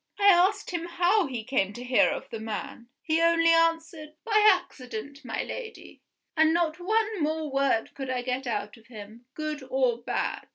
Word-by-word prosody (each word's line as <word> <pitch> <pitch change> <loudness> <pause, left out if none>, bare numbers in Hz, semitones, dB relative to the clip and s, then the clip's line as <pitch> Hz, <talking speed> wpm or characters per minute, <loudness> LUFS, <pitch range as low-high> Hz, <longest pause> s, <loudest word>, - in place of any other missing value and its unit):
I 405 - +1
asked 385 +3 +3
him 345 -1 -3
how 355 +2 +2
he 245 -4 -5
came 210 -5 0
to 240 - -8
hear 250 0 +3
of - - -5
the 225 - -5
man. 235 +3 -6
He 320 0 +1
only 335 0 +4
answered, 325 -2 0
'By 425 -1 +5
accident, 280 - -5
my - - -3
Lady' 460 -3 -9 0.3
and 315 0 +4
not 335 -1 0
one 435 +1 0
more 310 0 -1
word 275 -4 0
could 270 -2 -6
I 250 -1 -2
get 255 +1 -3
out 210 -1 -3
of 230 0 -21
him, 220 +1 -12
good 305 -1 -4
or 255 -3 +1
bad. 240 - -3
305 Hz, 180 wpm, -27 LUFS, 245-340 Hz, 0.3 s, By